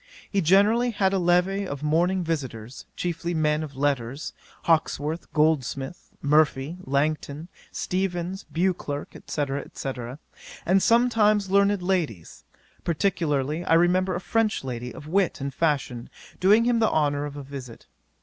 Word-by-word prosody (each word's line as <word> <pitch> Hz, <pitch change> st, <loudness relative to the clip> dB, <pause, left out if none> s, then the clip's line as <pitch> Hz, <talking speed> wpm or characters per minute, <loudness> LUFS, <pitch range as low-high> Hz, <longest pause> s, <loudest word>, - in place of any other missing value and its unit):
He 200 Hz, -, +2 dB
generally 205 Hz, +8 st, +4 dB
had 195 Hz, -4 st, +1 dB
a 195 Hz, -, +2 dB
levee 180 Hz, +3 st, +2 dB
of 140 Hz, -2 st, -6 dB
morning 175 Hz, +5 st, +2 dB
visitors, 130 Hz, -7 st, -5 dB
chiefly 170 Hz, 0 st, -3 dB
men 150 Hz, -1 st, +1 dB
of 145 Hz, -3 st, -7 dB
letters; 135 Hz, +1 st, -1 dB, 0.3 s
Hawkesworth, 160 Hz, -1 st, 0 dB
Goldsmith, 150 Hz, -1 st, 0 dB
Murphy, 150 Hz, 0 st, +2 dB
Langton, 150 Hz, +2 st, -1 dB, 0.2 s
Steevens, 185 Hz, 0 st, -2 dB
Beauclerk, 165 Hz, -5 st, -2 dB
&c. 145 Hz, -, -1 dB, 0.3 s
&c., 135 Hz, -, -4 dB, 0.8 s
and 190 Hz, +2 st, +4 dB
sometimes 215 Hz, -4 st, +3 dB
learned 200 Hz, -1 st, +3 dB
ladies, 165 Hz, -, -2 dB, 0.4 s
particularly 160 Hz, -3 st, 0 dB
I 165 Hz, -, +3 dB
remember 180 Hz, +2 st, +3 dB
a -, -, -2 dB
French 220 Hz, 0 st, 0 dB
lady 125 Hz, -1 st, -5 dB
of 145 Hz, -, -10 dB
wit 185 Hz, +3 st, +1 dB
and 140 Hz, 0 st, -4 dB
fashion 135 Hz, -6 st, -1 dB, 0.3 s
doing 210 Hz, +5 st, +5 dB
him 240 Hz, -1 st, +2 dB
the 220 Hz, -, +3 dB
honour 145 Hz, -2 st, +1 dB
of 145 Hz, 0 st, -9 dB
a 145 Hz, -, -6 dB
visit. 135 Hz, -4 st, -9 dB
165 Hz, 135 wpm, -25 LUFS, 145-190 Hz, 0.8 s, doing